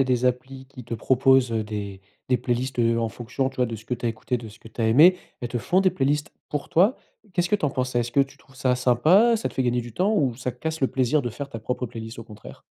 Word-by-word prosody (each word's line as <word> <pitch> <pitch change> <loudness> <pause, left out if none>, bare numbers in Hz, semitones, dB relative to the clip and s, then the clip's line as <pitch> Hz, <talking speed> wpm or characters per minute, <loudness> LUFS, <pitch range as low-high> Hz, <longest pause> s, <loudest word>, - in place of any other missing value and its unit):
a - - -1
des 125 -1 0
applis 130 +1 -2
qui 130 -3 -12
te 115 - -4
proposent, 130 +1 +3
heu, 110 -1 0
des 100 -2 -6 0.3
des 125 - +3
playlists 125 +1 -2
heu, 115 0 +3
en 115 -1 -1
fonction, 125 +3 -3
tu 135 - -19
vois, 125 - +2
de 115 -1 -5
ce 110 - -14
que 125 - -6
tu 120 0 -2
as - - +2
écouté, 115 +2 -3
de 115 -2 -9
ce 105 - -15
que 115 - -13
tu 115 - -8
as 110 - +2
aimé. 165 +11 +6 0.2
Elles 120 - -2
te 120 - -2
font 185 - +2
des 185 - +4
playlists 145 +1 -1 0.2
pour 145 -1 -4
toi, 195 +9 +4 0.4
qu'est 175 - +2
ce 175 - -3
que - - +3
tu 190 - -1
en - - +2
penses 130 -1 -2
ça? 120 - 0
Est-ce 120 0 -1
que 140 - +4
tu 135 0 -2
trouves 135 - -22
ça 130 -1 +1
sympa? 160 - +4
Ça 220 - -4
te - - -16
fait 130 - +1
gagner 120 -1 0
du 120 -1 -10
temps, 195 - +1
ou 130 - +1
ça 125 +1 -4
casse 160 +6 -5
le 135 - +3
plaisir 130 +4 +1
de 120 - -3
faire 140 +4 -7
ta 115 - -6
propre 125 +3 -3
playlist 115 -1 -7
au 115 - -7
contraire? 105 -2 -13
125 Hz, 305 wpm, -24 LUFS, 115-140 Hz, 0.4 s, aimé